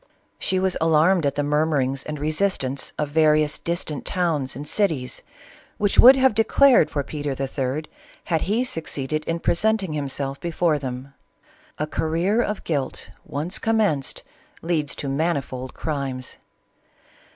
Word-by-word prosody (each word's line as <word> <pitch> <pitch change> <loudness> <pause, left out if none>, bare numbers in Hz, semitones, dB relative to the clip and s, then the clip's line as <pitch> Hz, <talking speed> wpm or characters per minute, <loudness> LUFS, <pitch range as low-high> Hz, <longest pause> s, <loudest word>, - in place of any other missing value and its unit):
She 185 - 0
was 190 -1 +1
alarmed 165 +1 +4
at 140 - -2
the 145 - 0
murmurings 145 -3 +1
and 150 0 -5
resist 155 +5 0
ance 130 +1 -4
of 150 -1 -1
various 155 -1 +3
distant 170 -4 -3
towns 160 -9 -1
and 145 +3 -7
cities, 155 -12 -1 0.6
which 205 -1 +1
would 260 +3 +10
have 265 -2 +4
declared 225 - +5
for 145 - -2
Peter 145 -1 -4
III. 135 +2 -2 0.4
had 165 -3 0
he 220 +6 +1
succeeded 155 - -3
in 165 - -1
pre - - +1
senting 200 -2 0
himself 140 -1 -3
before 170 -2 0
them. 130 0 -6 0.6
A 150 - -1
career 170 +8 0
of 210 -3 -3
guilt 140 -5 -3 0.2
once 155 +7 -2
commenced 210 -12 0 0.4
leads 160 -4 0
to 140 - -5
manifold 135 -3 -2
crimes. 135 -5 -4
155 Hz, 140 wpm, -23 LUFS, 140-180 Hz, 0.6 s, would